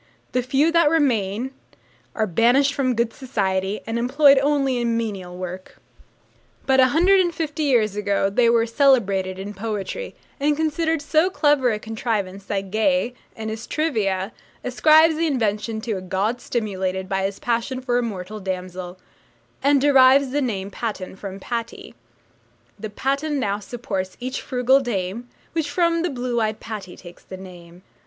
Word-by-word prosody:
The 250 - +1
few 270 +6 +2
that 335 -3 +4
remain 250 -6 +1 0.6
are 220 - +1
banished 240 +9 +3
from 255 -3 0
good 235 0 0
society, 195 -6 -2
and 225 +1 -2
employed 275 +3 +5
only 275 -2 +1
in 235 -1 0
menial 195 -6 -4
work; 185 +1 -7 0.9
but 265 0 +3
a 260 - +7
hundred 355 +8 +4
and 350 -2 +2
fifty 315 -1 -3
years 235 -8 +2
ago 200 -1 +1
they 230 +4 +3
were 230 -1 +3
celebrated 215 -7 +2
in 200 +2 -6
poetry, 215 - -5 0.2
and 290 +1 +1
considered 320 0 0
so 315 +4 +3
clever 290 -8 +2
a 215 - -1
contrivance 210 -3 -3
that 195 -2 -3
Gay, 245 +3 +1 0.2
in 220 -1 -5
his 220 +2 -6
'Trivia,' 215 -11 -1 0.3
ascribes 310 +5 +5
the 330 +1 +1
invention 220 -4 -1
to 230 - -4
a - - -6
god 195 +6 -1
stimulated 190 -5 -2
by 195 -1 -1
his 195 0 -2
passion 240 +2 -2
for 245 -1 0
a - - +1
mortal 210 -2 -5
damsel, 185 -1 -5 0.6
and 280 +1 +4
derives 270 -1 +5
the 290 +2 0
name 200 -6 -3
'Patten' 205 -6 -5
from 195 0 -8
'Patty.' 230 +2 -5 0.9
The 215 +1 -5
patten 275 +6 -1
now 205 -4 -1
supports 195 -4 -5
each 255 +2 -4
frugal 255 +1 +3
dame, 235 -1 -3 0.2
Which 320 -3 -1
from 335 +2 +1
the 350 - 0
blue 245 -3 -2
eyed 215 0 -1
Patty 205 -5 -7
takes 175 -1 -13
the 185 - -9
name. 180 -1 -13
235 Hz, 160 wpm, -22 LUFS, 195-275 Hz, 0.9 s, a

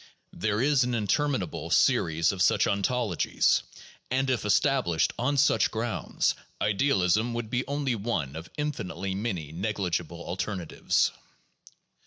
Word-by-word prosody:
There 110 0 -1
is 140 -2 +4
an 125 0 -1
interminable 115 - -1
series 80 0 +3
of 95 -2 -4
such 105 +1 +4
ontologies, 100 -1 +1 0.5
and 130 +1 +1
if 120 -5 -1
established 105 - +2
on 140 +4 +1
such 130 -5 +4
grounds, 115 +1 -1 0.3
idealism 105 0 +2
would 115 -2 -4
be 125 +1 -1
only 140 -2 -1
one 100 - -2
of 80 +1 -8
infinitely 100 -10 -3
many 95 -7 -3
negligible 90 -3 -2
alternatives. 90 -1 -1
105 Hz, 120 wpm, -27 LUFS, 90-125 Hz, 0.5 s, is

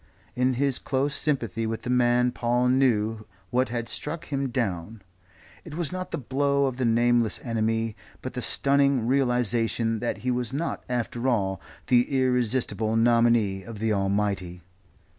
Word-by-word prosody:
In 125 +1 +1
his 135 0 0
close 140 +1 -1
sympathy 115 -8 -1
with 110 0 -4
the 125 - -2
man 125 0 +3
Paul 120 +1 +1
knew 115 -4 +1 0.2
what 125 0 +1
had 120 -1 -3
struck 155 +7 -4
him 140 -2 -2
down. 105 -3 -3 0.6
It 155 -3 -9
was 170 -3 -2
not 185 0 -4
the - - -3
blow 140 +2 +1
of 130 -2 -2
the 130 - 0
nameless 120 0 +2
enemy, 115 -1 -1 0.3
but 130 - -5
the 125 - -4
stunning 140 -2 +2
realization 120 -3 +1
that 120 - -2
he 125 - +2
was 125 0 -1
not, 160 +5 -3
after 120 0 -2
all, 95 -7 0 0.2
the 125 -1 +3
irresistible 120 -4 +1
nominee 115 -4 +3
of 110 +3 -9
the 110 +1 0
Almighty. 95 -3 -1
120 Hz, 155 wpm, -26 LUFS, 110-130 Hz, 0.6 s, man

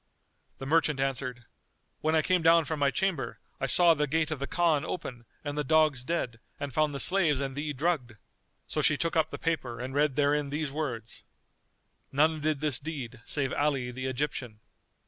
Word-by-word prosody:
The 135 - -7
merchant 150 -1 +2
answered, 130 -3 -2 0.5
"When 155 +1 +1
I 155 - +3
came 180 +1 +2
down 165 0 +5
from 160 -1 -3
my 140 -1 +3
chamber 185 -2 -1 0.2
I 135 - -1
saw 170 +3 +6
the 150 -1 0
gate 155 +2 0
of 155 - -3
the 140 - -3
Khan 165 -4 +2
open 125 -10 -5 0.2
and 145 -1 -4
the 150 - 0
dogs 155 -2 +3
dead 125 -7 -2 0.2
and 140 -2 -4
found 150 0 +1
the - - -3
slaves 170 -7 +3
and 135 -1 -3
thee 150 +1 -2
drugged." 145 -4 -1 0.5
So - - -2
she 150 - +3
took 165 +2 -1
up 160 -2 +2
the - - -6
paper 130 -8 -2
and 130 +2 -5
read 145 -1 +2
therein 145 0 +2
these 150 0 -2
words, 125 -7 -5 0.9
"None 155 +2 +2
did 150 -1 0
this 150 -4 +1
deed 135 -6 -6
save 135 -3 0
Ali 140 -4 0
the 130 +1 -4
Egyptian." 125 -4 -3
145 Hz, 190 wpm, -29 LUFS, 130-155 Hz, 0.9 s, saw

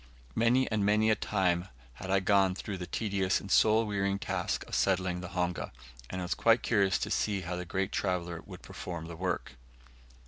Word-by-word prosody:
Many 125 - +3
and 110 -2 +1
many 105 +2 +3
a - - +4
time 90 -4 0 0.3
had 95 +10 -8
I 95 0 +3
gone 95 -1 +3
through 95 -1 -5
the 90 - -5
tedious 100 -4 0
and 100 - -8
soul 110 +1 +5
wearying 100 -1 0
task - - -2
of - - -13
settling 90 -2 +1
the 90 - -6
honga, 90 -1 -1 0.4
and 95 - -4
I - - -3
was 90 - 0
quite 115 +1 +3
curious 100 -4 +3
to - - -3
see 100 -2 0
how 90 0 -4
the 90 0 -4
great 95 +2 -2
traveller 90 -3 -2
would - - -10
perform 85 -3 -6
the 85 0 -7
work. 90 -6 -3
95 Hz, 200 wpm, -30 LUFS, 90-105 Hz, 0.4 s, soul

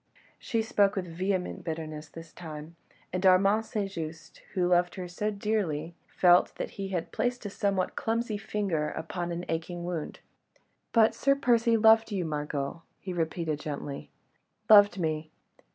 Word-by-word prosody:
She 230 -3 -1
spoke 205 -3 +2
with 190 -2 -2
vehement 185 0 -2
bitterness 155 -2 -5
this 165 +1 -11
time, 160 -1 -9 0.4
and 185 +1 -1
Armand 195 +4 +4
St. 205 -2 -2
Just, 165 -2 -7 0.2
who 180 -2 +2
loved 175 0 +3
her 185 -1 -5
so 195 +5 -2
dearly, 200 -7 -1
felt 180 0 +4
that - - -4
he 195 -1 -5
had 175 -3 -3
placed 245 -1 -1
a 205 - -4
somewhat 195 -2 0
clumsy 225 -2 -1
finger 195 -8 -1
upon 175 +2 -4
an 170 +1 -4
aching 165 +2 -3
wound. 175 -3 -4 0.7
"But 225 -2 +5
Sir 275 +1 +2
Percy 235 -4 +3
loved 220 0 +5
you, 190 -4 -1
Margot," 150 0 -3 0.2
he 185 - -5
repeated 160 -2 -2
gently. 145 -2 -6 0.6
"Loved 205 -2 +7
me? 155 -2 -2
180 Hz, 150 wpm, -29 LUFS, 160-210 Hz, 0.7 s, Loved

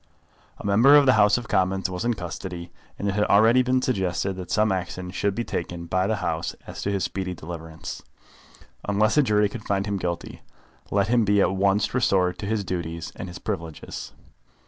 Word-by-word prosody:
A - - -10
member 115 +8 +6
of 145 - +5
the 130 - +6
House 105 -1 +5
of 120 -2 -6
Commons 95 0 +1
was 90 +2 -4
in 120 0 +1
custody, 90 -2 -6 0.3
and 100 - -3
it - - +2
had 105 +1 +2
already 115 +5 +5
been 130 0 +1
suggested 95 -5 0
that 90 -1 -7
some 110 -1 +2
action 90 -1 -3
should 100 0 -1
be 120 - -1
taken 85 -4 -4
by 95 +3 0
the 110 - +1
House 85 -5 -2
as - - -8
to - - -1
his 100 -2 -1
speedy 95 -2 -3
deliverance. 80 0 -8 0.9
Unless 110 +3 +2
a - - +7
jury 105 -5 +3
could 105 +1 -8
find 100 -1 0
him 100 -2 -1
guilty, 85 -2 -4 0.5
let 100 0 +1
him 120 -1 +4
be 105 0 +3
at 95 - +3
once 100 +2 +1
restored 95 -7 +2
to 100 - -4
his 110 -1 0
duties 85 -3 -4
and 95 - -6
his 90 0 -8
privileges. 80 - -6
100 Hz, 200 wpm, -25 LUFS, 90-105 Hz, 0.9 s, a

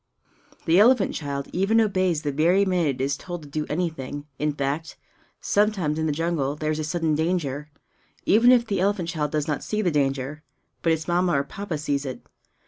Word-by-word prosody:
The 165 +3 +4
elephant 230 -1 +5
child 140 -2 -4
even 195 +5 +3
obeys 185 -7 +1
the 145 - -1
very 170 +7 +3
minute 170 -8 0
it - - 0
is 140 0 0
told 175 +1 -7
to - - -11
do 150 +1 -3
anything; 150 -4 -3
in 150 0 +1
fact, 145 +3 -3 0.4
sometimes 195 -7 +1
in 160 - 0
the - - +1
jungle 150 -3 -1
there 155 0 -2
is 155 - -2
a - - -1
sudden 160 0 0
danger, 150 -3 -1 0.6
even 235 +4 +6
if 240 -2 +5
the 205 -4 -1
elephant 190 -2 0
child 155 -3 -1
does 150 +1 -1
not 150 - -2
see 215 0 -1
the 175 - +2
danger. 140 0 -1 0.4
But 165 - +2
its 160 0 -3
Mamma 175 0 +2
or 140 -1 +2
Papa 185 +2 -5
sees 145 -2 -1
it. 130 -2 -7
160 Hz, 200 wpm, -24 LUFS, 145-185 Hz, 0.6 s, even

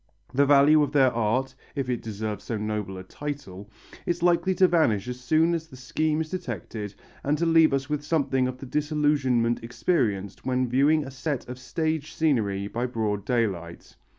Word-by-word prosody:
The 140 +2 +3
value 145 +2 +6
of 145 -2 +1
their 135 -3 +4
art 115 +4 0 0.2
if 135 -3 -2
it 125 -1 -1
deserves 105 -1 -5
so 115 - -2
noble 105 -2 -3
a 95 - -7
title 105 -5 -7 0.4
is 175 0 -1
likely 175 +2 +3
to 185 - +5
vanish 125 - +2
as 125 0 -5
soon 155 +6 +2
as 160 -1 -3
the 130 - -13
scheme 155 +5 -1
is 155 - -5
detected 110 - -5 0.3
and 145 +2 +1
to 170 - 0
leave 165 -1 +5
us 135 -1 -1
with 150 -1 -2
something 140 -4 +1
of 130 0 -5
the 135 - -9
disillusionment 140 -5 +1
experienced 115 - -1
when 130 -1 0
viewing 145 +5 +3
a 135 - -8
set 135 0 -3
of 125 +1 -7
stage 155 +2 -2
scenery 110 -11 +1
by 120 +4 -2
broad 105 -4 -2
daylight. 95 -9 -2
130 Hz, 180 wpm, -26 LUFS, 110-155 Hz, 0.4 s, value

